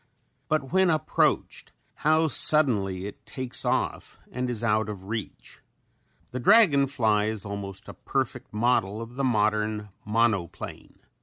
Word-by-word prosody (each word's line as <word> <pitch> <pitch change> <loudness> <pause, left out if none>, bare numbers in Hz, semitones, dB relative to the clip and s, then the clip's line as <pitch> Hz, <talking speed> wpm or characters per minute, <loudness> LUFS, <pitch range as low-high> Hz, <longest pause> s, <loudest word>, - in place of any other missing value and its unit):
But 150 -4 -1
when 190 -1 +4
approached 155 -1 0 0.2
how 155 +1 +3
suddenly 105 -12 +2
it 100 - -9
"takes 130 -2 -3
off" - - -2
and 125 0 -3
is 120 -2 -3
out 110 -2 +1
of 100 -3 -7
reach. 105 +1 -7 0.7
The 125 - -4
dragon 150 - +5
fly 110 -6 +1
is 110 -2 -4
an 100 - -6
almost 100 -1 -7 0.2
perfect - - -2
model 105 -2 +1
of 115 +1 -8
the 135 - -2
modern 105 -3 0
monoplane. 105 -5 -2
115 Hz, 135 wpm, -26 LUFS, 105-135 Hz, 0.7 s, dragon